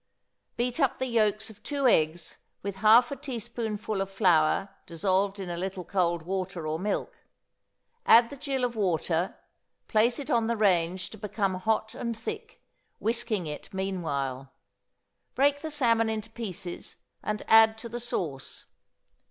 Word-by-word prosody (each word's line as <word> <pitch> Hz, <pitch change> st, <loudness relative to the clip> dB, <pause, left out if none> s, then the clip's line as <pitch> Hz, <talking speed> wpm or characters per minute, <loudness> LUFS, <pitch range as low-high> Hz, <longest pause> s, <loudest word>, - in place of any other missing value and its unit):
Beat 245 Hz, +4 st, -1 dB
up 275 Hz, -4 st, +2 dB
the 260 Hz, -, -1 dB
yolks 220 Hz, -3 st, +1 dB
of 210 Hz, -, -18 dB
two 280 Hz, -2 st, 0 dB
eggs 160 Hz, -5 st, +1 dB, 0.2 s
with 200 Hz, -1 st, -4 dB
half 225 Hz, +5 st, +6 dB
a -, -, -2 dB
teaspoonful 225 Hz, -5 st, -4 dB
of 195 Hz, -, -2 dB
flour 185 Hz, -1 st, +3 dB, 0.2 s
dissolved 195 Hz, +3 st, 0 dB
in 190 Hz, -, -5 dB
a 175 Hz, -, -3 dB
little 185 Hz, +1 st, -4 dB
cold 175 Hz, -2 st, 0 dB
water 185 Hz, -1 st, -3 dB
or 155 Hz, +1 st, -2 dB
milk: 205 Hz, +3 st, -2 dB, 0.9 s
add 230 Hz, +2 st, +7 dB
the -, -, -6 dB
gill 270 Hz, -2 st, -2 dB
of 245 Hz, -1 st, 0 dB
water, 175 Hz, -3 st, 0 dB, 0.5 s
place 235 Hz, +2 st, +3 dB
it 280 Hz, -, -5 dB
on 230 Hz, -2 st, +2 dB
the 235 Hz, 0 st, 0 dB
range 185 Hz, -2 st, +1 dB
to 220 Hz, -, -11 dB
become 200 Hz, -2 st, -1 dB
hot 220 Hz, +4 st, -1 dB
and 235 Hz, -2 st, -4 dB
thick, 225 Hz, -, -7 dB, 0.3 s
whisking 225 Hz, -4 st, 0 dB
it 150 Hz, +4 st, -7 dB
meanwhile; 140 Hz, -9 st, -3 dB, 0.8 s
break 285 Hz, +1 st, +3 dB
the 315 Hz, -, -4 dB
salmon 230 Hz, -6 st, +2 dB
into 220 Hz, 0 st, -4 dB
pieces, 190 Hz, -6 st, -6 dB, 0.2 s
and 210 Hz, 0 st, -3 dB
add 220 Hz, 0 st, +7 dB
to 225 Hz, -, -7 dB
the 235 Hz, +1 st, -5 dB
sauce. 165 Hz, -, -4 dB
210 Hz, 150 wpm, -28 LUFS, 180-235 Hz, 0.9 s, add